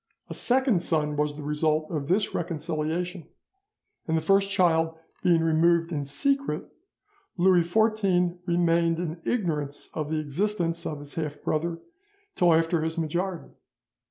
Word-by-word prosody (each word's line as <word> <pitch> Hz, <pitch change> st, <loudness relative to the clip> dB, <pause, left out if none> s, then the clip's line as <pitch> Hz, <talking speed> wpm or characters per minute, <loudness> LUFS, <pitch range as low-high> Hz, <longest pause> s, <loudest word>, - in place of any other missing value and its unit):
A -, -, -2 dB
second 255 Hz, -7 st, +2 dB
son 150 Hz, -3 st, 0 dB
was 150 Hz, 0 st, 0 dB
the 150 Hz, -, -8 dB
result 155 Hz, +1 st, 0 dB
of 145 Hz, -4 st, -3 dB
this 195 Hz, +5 st, +1 dB
reconciliation; 165 Hz, +1 st, -3 dB, 0.8 s
and 160 Hz, 0 st, +1 dB
the -, -, +3 dB
first 195 Hz, +4 st, +3 dB
child 165 Hz, -4 st, +2 dB, 0.2 s
being 170 Hz, -2 st, +3 dB
removed 165 Hz, +1 st, +3 dB
in 145 Hz, -3 st, -2 dB
secret, 275 Hz, -, -1 dB, 0.7 s
Louis 180 Hz, 0 st, +5 dB
XIV 180 Hz, -2 st, +1 dB
remained 170 Hz, -1 st, +2 dB
in 165 Hz, -1 st, -4 dB
ignorance 150 Hz, -, -2 dB
of 155 Hz, -2 st, -3 dB
the 160 Hz, -, -1 dB
existence 170 Hz, +2 st, -1 dB
of 150 Hz, -, -4 dB
his 145 Hz, 0 st, -8 dB
half 150 Hz, -2 st, -4 dB
brother 165 Hz, +2 st, -1 dB, 0.6 s
till 175 Hz, -1 st, +3 dB
after 165 Hz, +1 st, +2 dB
his 160 Hz, +1 st, -2 dB
majority. 170 Hz, +3 st, -3 dB
165 Hz, 140 wpm, -26 LUFS, 155-180 Hz, 0.8 s, Louis